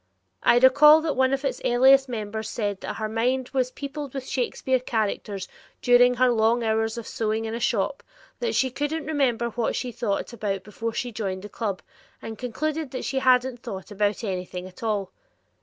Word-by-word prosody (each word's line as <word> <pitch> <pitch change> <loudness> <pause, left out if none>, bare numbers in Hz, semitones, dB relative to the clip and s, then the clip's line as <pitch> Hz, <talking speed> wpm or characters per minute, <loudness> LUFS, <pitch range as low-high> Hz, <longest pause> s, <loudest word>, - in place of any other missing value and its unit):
I 240 - +5
recall 285 +5 +7
that 310 -2 -1
one 260 0 +3
of 275 +1 -1
its 270 - -2
earliest 265 +2 +5
members 220 -1 -4
said 205 -3 -3
that - - -5
her 220 - -3
mind 250 +4 0
was 255 -2 0
peopled 280 0 -7
with 265 -1 -5
Shakespeare 260 0 0
characters 210 -5 -2 0.3
during 245 0 +5
her 255 0 +4
long 230 +1 +2
hours 225 0 0
of 235 - -5
sewing 220 0 -2
in 220 - -4
a 230 - -3
shop, 235 +3 0 0.4
that 475 - -1
she 260 -1 +2
couldn't 290 +4 -2
remember 260 -6 0
what 230 0 -1
she 250 - -3
thought 220 0 -2
about 200 -4 -3
before 225 +3 -5
she 245 +1 -3
joined 195 -4 -4
the 210 - -8
club, 205 -5 -4 0.4
and 220 -1 -8
concluded 305 +5 -3
that 255 - -5
she 270 - -1
hadn't 255 -1 +3
thought 190 +1 -7
about 205 +2 0
anything 180 -2 -4
at 185 - -15
all. 210 -4 -1
240 Hz, 190 wpm, -25 LUFS, 215-260 Hz, 0.4 s, recall